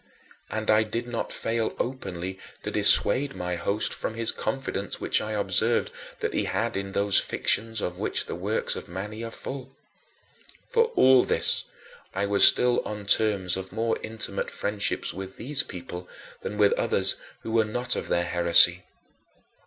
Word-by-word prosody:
And 110 0 -1
I 110 0 +5
did 115 +3 -3
not 120 -1 -4
fail 115 0 -2
openly 95 -7 -4 0.2
to - - -4
dissuade 140 +6 +3
my 90 0 -3
host 100 +5 -2
from 110 - -4
his 115 -1 0
confidence 135 -7 -3
which - - +1
I 110 0 -4
observed 100 -4 +1 0.3
that - - -2
he - - 0
had - - -2
in 95 0 -4
those 100 0 +4
fictions 110 +1 0
of 90 0 -4
which - - -1
the - - -6
works - - 0
of - - -7
Mani 105 +5 -6
are 115 - -4
full. 135 +3 -8 0.9
For 465 -1 +3
all 130 -1 +6
this, - - +1 0.5
I 100 +1 0
was 100 0 +3
still 125 0 +6
on 105 -1 -6
terms 100 -3 +2
of 95 0 -6
more 115 +2 -1
intimate 110 -3 -4
friendship 105 0 -2
with 95 +1 -8
these 140 +4 +3
people 90 -5 -8 0.3
than 105 - -5
with 105 -1 +4
others - - +1 0.3
who 115 - -6
were 115 0 +3
not 120 +3 -1
of - - -4
their 85 0 0
heresy. 85 0 +6
105 Hz, 165 wpm, -26 LUFS, 95-115 Hz, 0.9 s, all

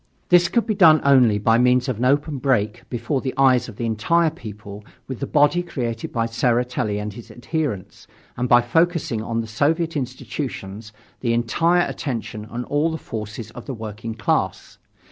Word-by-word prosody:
This 175 -1 +6
could 235 - +1
be 220 - 0
done 165 -6 +6
only 130 -6 +5
by 115 +3 +3
means 125 +1 +3
of 125 -4 -2
an 125 - 0
open 145 +2 +1
break, 120 -4 0
before 120 +3 -2
the 130 - -4
eyes 130 -3 +4
of 110 - -10
the 120 - -4
entire 155 +10 +2
people, 105 -7 -10 0.2
with 130 -3 -6
the 140 - -3
body 145 +4 +3
created 120 -10 -4
by 115 -1 0
Tseretelli 115 -2 0
and 105 0 -4
his 115 +2 -11
adherents, 125 - -4 0.3
and 125 0 -2
by 120 0 +7
focusing 160 -2 +1
on 115 +1 -2
the - - -6
Soviet 160 +9 0
institutions, 125 -5 -5 0.3
the 115 -2 0
entire 165 +10 +2
attention 110 -5 -5
and 120 +2 -5
all 145 +3 +1
the 160 - -3
forces 110 -3 -7
of 120 +2 -11
the 135 - -4
working 110 0 -6
class. 115 -2 -2
120 Hz, 180 wpm, -22 LUFS, 115-145 Hz, 0.3 s, by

